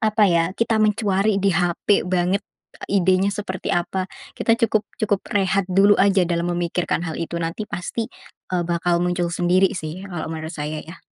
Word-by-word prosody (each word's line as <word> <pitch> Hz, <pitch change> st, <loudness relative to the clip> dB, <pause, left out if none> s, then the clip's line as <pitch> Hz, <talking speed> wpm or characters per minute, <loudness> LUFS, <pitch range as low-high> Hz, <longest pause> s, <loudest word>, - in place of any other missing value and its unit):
apa 215 Hz, -1 st, +3 dB
ya, 165 Hz, 0 st, +3 dB
kita 225 Hz, -1 st, +1 dB
mencari 210 Hz, -1 st, +2 dB
di 195 Hz, -1 st, +2 dB
hape 180 Hz, +3 st, +1 dB
banget, 185 Hz, +2 st, +1 dB, 0.5 s
idenya 190 Hz, 0 st, +3 dB
seperti 190 Hz, -2 st, -5 dB
apa. 185 Hz, +2 st, -1 dB, 0.3 s
Kita 230 Hz, 0 st, +2 dB
cukup 220 Hz, -3 st, +2 dB, 0.2 s
cukup 205 Hz, -3 st, +1 dB
rehat 195 Hz, -1 st, +2 dB
dulu 195 Hz, +2 st, +5 dB
aja, 195 Hz, -2 st, +4 dB
dalam 170 Hz, 0 st, 0 dB
memikirkan 175 Hz, 0 st, -1 dB
hal 160 Hz, -, -4 dB
itu. 170 Hz, +1 st, -4 dB
Nanti 165 Hz, +6 st, -3 dB
pasti, 220 Hz, +5 st, -4 dB, 0.4 s
eee, 175 Hz, -1 st, +1 dB
bakal 170 Hz, 0 st, +1 dB
muncul 175 Hz, -1 st, 0 dB
sendiri, 180 Hz, +2 st, +3 dB
sih, 160 Hz, +2 st, -5 dB
kalau 175 Hz, -4 st, -4 dB
menurut 160 Hz, 0 st, -5 dB
saya, 150 Hz, 0 st, -4 dB
ya. 165 Hz, +2 st, -12 dB
185 Hz, 165 wpm, -22 LUFS, 175-200 Hz, 0.5 s, dulu